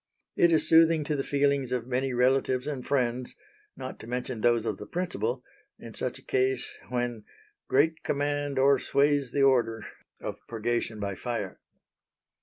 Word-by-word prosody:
It 170 - +4
is 160 - +4
soothing 165 -1 +5
to 150 +1 -1
the 140 - 0
feelings 140 -2 +1
of 125 -2 -1
many 130 +1 -1
relatives 130 +1 +2
and 140 -4 -4
friends 125 -2 -1 0.4
not 130 - -7
to - - -10
mention 125 -1 -3
those 120 -1 +3
of - - -2
the - - -8
principal 125 - -2 0.3
in - - -10
such - - -3
a - - -16
case 130 -1 0
when 120 -3 -2 0.4
"great 160 +4 +2
command 145 -1 -1
o'ersways 140 0 +3
the 140 +1 +2
order" 115 -5 +2 0.3
of - - -6
purgation 115 -1 -2
by 100 -1 -2
fire. 105 -1 -4
130 Hz, 155 wpm, -28 LUFS, 120-140 Hz, 0.4 s, soothing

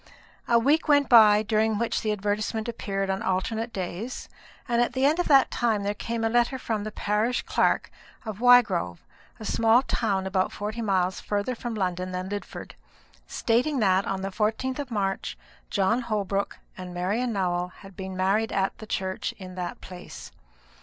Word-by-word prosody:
A 235 - +5
week 290 +8 +2
went 285 -1 +4
by, 215 -3 +7
during 220 0 +1
which 235 +1 -1
the 215 - 0
advertisement 210 +2 -2
appeared 195 -4 -2
on 190 +1 -2
alternate 220 +5 -1
days; 195 +6 -5 0.4
and 240 -1 +2
at 240 - 0
the 260 +1 +1
end 305 +5 +3
of 355 - +1
that 275 -3 +5
time 225 -4 0
there 205 +1 0
came 230 +2 -4
a - - +3
letter 240 +3 +2
from 220 -4 -3
the 215 - -5
parish 215 +4 0
clerk - - +1 0.3
of 215 -2 -5
Wygrove, 215 - +5 0.4
a 215 - -7
small 230 +4 +4
town 200 -7 -1
about 190 -1 0
forty 215 +3 -4
miles 190 -4 0
farther 205 +4 -2
from 235 -1 -5
London 185 -2 -2
than 185 +1 -4
Lidford, 205 0 -6 0.5
stating 250 +6 +1
that, 195 -4 +2
on 190 0 -2
the 195 - -2
14th 225 +6 -1
of 285 -3 -4
March, 195 -4 -2 0.3
John 205 +4 +1
Holbrook 200 -4 -2 0.2
and 180 -1 -8
Marian 210 +8 -1
Nowell 180 -3 0
had 195 +1 -15
been 190 0 -6
married 200 +4 +1
at 195 0 0
the 215 - -9
church 190 -2 -3
in 185 -2 -9
that 180 -1 -5
place. 180 -1 -10
210 Hz, 175 wpm, -26 LUFS, 190-235 Hz, 0.5 s, by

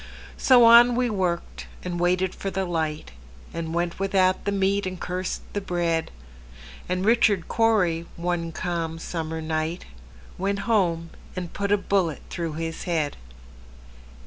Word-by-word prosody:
So 250 -3 +6
on 235 +1 +8
we 245 -1 +1
worked, 180 -4 -2 0.2
and 175 -1 -3
waited 180 +1 +1
for 195 - -4
the 190 0 -2
light, 160 - -2 0.4
And 165 -1 -4
went 170 +1 -2
without 190 -1 +2
the 200 - +1
meat, 195 0 +1
and 185 -1 -5
cursed 180 +1 -3
the 205 - -1
bread; 170 -3 -1 0.8
And 185 +1 -1
Richard 220 -5 +3
Cory, 180 -8 +2
one 170 -1 -2
calm 165 -1 -3
summer 160 -1 -4
night, 160 +2 -2 0.5
Went 200 +1 -1
home 170 -7 +1 0.2
and 180 -2 -5
put 200 0 -2
a 205 - +5
bullet 190 -6 0
through 170 -3 -3
his 165 +1 -4
head. 160 -5 0
180 Hz, 145 wpm, -25 LUFS, 165-200 Hz, 0.8 s, on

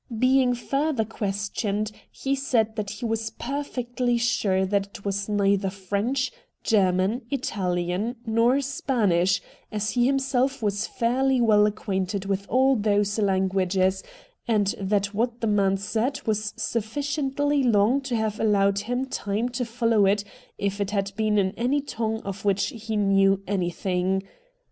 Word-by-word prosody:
Being 255 +1 +3
further 275 0 0
questioned, 205 0 -2 0.2
he 275 - -3
said 225 -6 0
he 210 +4 -6
was 225 0 -1
perfectly 250 -2 -2
sure 200 -5 +1
that 200 +1 0
it 200 0 -13
was 200 +1 -2
neither 200 -1 +2
French, 200 +8 -1 0.3
German, 195 +2 +2
Italian, 190 -4 -1
nor 230 +4 +3
Spanish, 200 -10 +1 0.3
as 215 0 -1
he 245 0 +2
himself 270 -1 +1
was 205 +1 0
fairly 260 +3 +1
well 210 -3 +5
acquainted 195 -2 -2
with 195 0 -2
all 265 +1 +4
those 205 -1 +1
languages, 190 -1 +1 0.5
and 210 -4 +2
that 200 +1 0
what 235 +3 -1
the 230 - -2
man 200 -2 +2
said 230 +7 -1
was 215 -1 -1
sufficiently 285 +5 -1
long 235 +2 +3
to 260 -3 -3
have 220 -1 -1
allowed 200 -2 +3
him 245 +5 -2
time 220 -2 -2
to 245 +1 -2
follow 230 -3 +2
it 200 +1 +2 0.3
if 200 0 -2
it 200 - -1
had 200 -1 -1
been 215 -1 +1
in 190 -2 +2
any 250 +7 0
tongue 225 -5 -3
of 195 0 -6
which 200 -1 +1
he 220 -1 -5
knew 195 -1 +3
anything. 185 0 -1
215 Hz, 140 wpm, -25 LUFS, 195-245 Hz, 0.5 s, well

